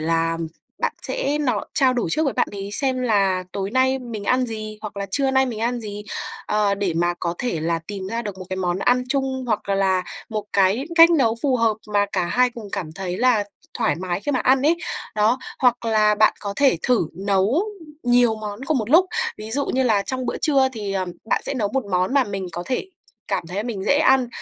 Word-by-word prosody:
là, 165 Hz, +1 st, +1 dB
ừm, 165 Hz, 0 st, -3 dB, 0.3 s
bạn -, -, 0 dB
sẽ 300 Hz, -, -1 dB
no 275 Hz, -4 st, 0 dB
trao 265 Hz, -3 st, +4 dB
đổi 245 Hz, -6 st, -1 dB
trước 315 Hz, -, +1 dB
với 275 Hz, -, +1 dB
bạn -, -, +1 dB
ấy 200 Hz, 0 st, -6 dB
xem 260 Hz, +1 st, 0 dB
là 195 Hz, -5 st, +2 dB
"Tối 195 Hz, 0 st, -3 dB
nay 260 Hz, +1 st, +2 dB
mình 230 Hz, -5 st, -7 dB
ăn 255 Hz, +2 st, +2 dB
gì 215 Hz, -1 st, -6 dB
hoặc 210 Hz, -1 st, -7 dB
là 200 Hz, 0 st, -3 dB
trưa 275 Hz, -1 st, +2 dB
nay 265 Hz, 0 st, +3 dB
mình 225 Hz, -3 st, -5 dB
ăn 240 Hz, +1 st, -1 dB
gì?" 210 Hz, -1 st, -6 dB, 0.4 s
Ờ, 210 Hz, -1 st, +2 dB
để 195 Hz, -4 st, -1 dB
mà 175 Hz, +1 st, +1 dB
có 170 Hz, 0 st, -1 dB
thể 240 Hz, -11 st, -2 dB, 0.3 s
tìm 195 Hz, -2 st, -5 dB
ra 230 Hz, +3 st, -3 dB
được 200 Hz, -3 st, -6 dB
một 185 Hz, -, -7 dB
cái 185 Hz, -, -3 dB
món 180 Hz, -1 st, -1 dB
ăn 250 Hz, +4 st, +2 dB
chung 265 Hz, -1 st, -1 dB
hoặc 215 Hz, -3 st, -1 dB
là 190 Hz, -2 st, +2 dB, 0.3 s
một 215 Hz, -2 st, -3 dB
cái 200 Hz, +7 st, +3 dB
cách 335 Hz, 0 st, +8 dB
nấu 250 Hz, -9 st, +3 dB
phù 265 Hz, -3 st, +2 dB
hợp 225 Hz, -2 st, +2 dB, 0.2 s
mà 205 Hz, 0 st, +3 dB
cả 185 Hz, -2 st, +1 dB
hai 250 Hz, +6 st, +2 dB
cùng 230 Hz, -4 st, -9 dB
cảm 170 Hz, -6 st, -3 dB
thấy 185 Hz, +1 st, -4 dB
là 240 Hz, -4 st, +3 dB, 0.3 s
thoải 225 Hz, -2 st, +2 dB
mái 180 Hz, +1 st, -3 dB
khi 290 Hz, -, -2 dB
mà 255 Hz, -, +1 dB
ăn 260 Hz, +1 st, +3 dB
ấy, 325 Hz, +4 st, +3 dB, 0.4 s
đó, 215 Hz, +4 st, +3 dB, 0.2 s
hoặc 245 Hz, -2 st, +2 dB
là 215 Hz, -2 st, +3 dB
bạn 215 Hz, +1 st, +4 dB
có 200 Hz, -1 st, -4 dB
thể 275 Hz, -10 st, +4 dB
thử 240 Hz, -10 st, +2 dB
nấu 200 Hz, -, +1 dB, 0.4 s
nhiều 245 Hz, -2 st, +4 dB
món 210 Hz, +1 st, -6 dB
cùng 300 Hz, 0 st, +1 dB
một 225 Hz, +1 st, -3 dB
lúc, 360 Hz, +4 st, +6 dB, 0.3 s
ví 215 Hz, +1 st, -7 dB
dụ 280 Hz, +4 st, -1 dB
như 265 Hz, -, +1 dB
là 215 Hz, -5 st, +3 dB
trong 255 Hz, +3 st, -3 dB
bữa -, -, -2 dB
trưa 275 Hz, -4 st, +3 dB
thì, 205 Hz, -4 st, -4 dB
ờm, 185 Hz, -2 st, -2 dB
bạn -, -, 0 dB
sẽ -, -, -2 dB
nấu 210 Hz, -5 st, 0 dB
một 265 Hz, -4 st, 0 dB
món 185 Hz, +4 st, 0 dB
mà 275 Hz, -2 st, +4 dB
mình 195 Hz, -2 st, -4 dB
có 175 Hz, -, -4 dB
thể 255 Hz, +7 st, -2 dB, 0.4 s
cảm 190 Hz, -4 st, -1 dB
thấy 190 Hz, +5 st, -3 dB
mình 220 Hz, -5 st, -4 dB
dễ 285 Hz, -, +3 dB
ăn, 265 Hz, -5 st, +4 dB
220 Hz, 235 wpm, -22 LUFS, 195-255 Hz, 0.4 s, cách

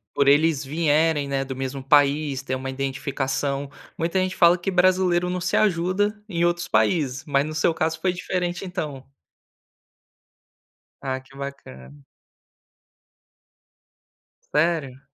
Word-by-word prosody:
por 140 Hz, -, +2 dB
eles 150 Hz, 0 st, +4 dB
vierem, 155 Hz, 0 st, +1 dB
né, 135 Hz, -1 st, -1 dB
do 135 Hz, -1 st, -6 dB
mesmo 135 Hz, +1 st, -5 dB
país, 145 Hz, -1 st, +2 dB
ter 130 Hz, -1 st, -4 dB
uma 130 Hz, +1 st, -3 dB
identificação. 135 Hz, +1 st, -2 dB, 0.3 s
Muita 170 Hz, +3 st, 0 dB
gente 185 Hz, 0 st, -1 dB
fala 170 Hz, +1 st, +5 dB
que 175 Hz, -, -2 dB
brasileiro 180 Hz, -1 st, +3 dB
não 180 Hz, 0 st, -2 dB
se 180 Hz, -, 0 dB
ajuda 205 Hz, +2 st, +1 dB
em 170 Hz, -3 st, +1 dB
outros 175 Hz, 0 st, 0 dB
países, 145 Hz, -5 st, +1 dB
mas 140 Hz, -2 st, +2 dB
no 155 Hz, -, -6 dB
seu 165 Hz, -, +2 dB
caso 160 Hz, 0 st, -1 dB
foi 185 Hz, +1 st, 0 dB
diferente, 180 Hz, 0 st, -3 dB
então. 155 Hz, -8 st, -5 dB, 2.0 s
Ah, 130 Hz, -1 st, -3 dB
que 130 Hz, +1 st, -20 dB
bacana. 70 Hz, -, -9 dB, 2.5 s
Sério? 150 Hz, -4 st, 0 dB
150 Hz, 125 wpm, -23 LUFS, 135-175 Hz, 2.5 s, fala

